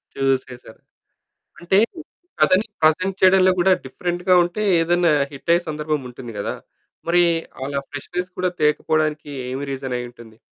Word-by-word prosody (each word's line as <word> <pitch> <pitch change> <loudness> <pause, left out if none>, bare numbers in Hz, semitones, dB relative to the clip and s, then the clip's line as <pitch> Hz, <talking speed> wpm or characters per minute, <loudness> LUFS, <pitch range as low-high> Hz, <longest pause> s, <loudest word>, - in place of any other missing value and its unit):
చూసేసారు. 130 -4 -2 0.8
అంటే 175 +3 +1 0.6
కథని 190 +4 +4 0.2
ప్రెజెంట్ 185 +5 +2
చేయడంలో 185 0 +6
కూడా 190 +2 +4
డిఫరెంట్‌గా 175 +6 0
ఉంటే 175 +4 -4 0.2
ఏదైనా 175 0 +2 0.2
హిట్ 145 +4 -3
అయ్యే 175 0 +1
సందర్భం 150 -1 -2
ఉంటుంది 120 -1 -9
కదా! - - -2 0.6
మరి 175 +1 +5 0.4
అలా 140 0 -2
ఫ్రెష్నెస్ 175 +6 -5
కూడా 180 0 +1
తేకపోవడానికి 150 0 +1 0.2
ఏమి 130 +2 -4
రీజన్ 130 -2 -4
అయ్యూంటుంది? 120 -2 -11
155 Hz, 125 wpm, -21 LUFS, 135-180 Hz, 0.8 s, చేయడంలో